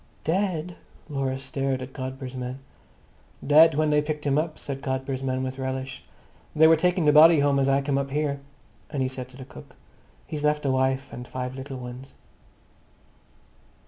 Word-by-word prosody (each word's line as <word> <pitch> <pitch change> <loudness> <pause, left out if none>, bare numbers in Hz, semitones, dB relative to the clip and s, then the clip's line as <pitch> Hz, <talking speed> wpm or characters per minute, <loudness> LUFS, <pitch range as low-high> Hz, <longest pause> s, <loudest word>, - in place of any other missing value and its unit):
"Dead!" 175 -1 -1 0.3
Laura 135 -2 -2
stared 135 0 -2
at 130 - -10
Godber's 130 -1 -6
man. 125 0 -5 0.9
"Dead 155 +2 +7
when 155 0 +2
they 150 0 +4
picked 150 0 -4
him 140 -1 +2
up," 155 +1 -1
said 135 -1 -6
Godber's 130 0 -3
man 130 -1 -1
with 130 +1 -5
relish. 130 0 -4 0.5
"They 155 +1 +6
were 160 0 +7
taking 175 +1 +1
the 150 - +5
body 160 +2 +8
home 140 -1 +3
as 135 0 +2
I 135 0 +2
come 135 -1 0
up 140 0 -3
here." 145 0 -1 0.5
And 140 -3 -1
he - - +1
said 130 -1 -6
to 130 - -15
the 130 - -9
cook, - - -14 0.5
"He's 150 -1 -5
left 150 0 +1
a 135 - +2
wife 130 +1 0
and 125 +1 -7
five 125 0 -4
little 135 0 -7
ones." 125 +1 -9
135 Hz, 180 wpm, -25 LUFS, 130-150 Hz, 0.9 s, body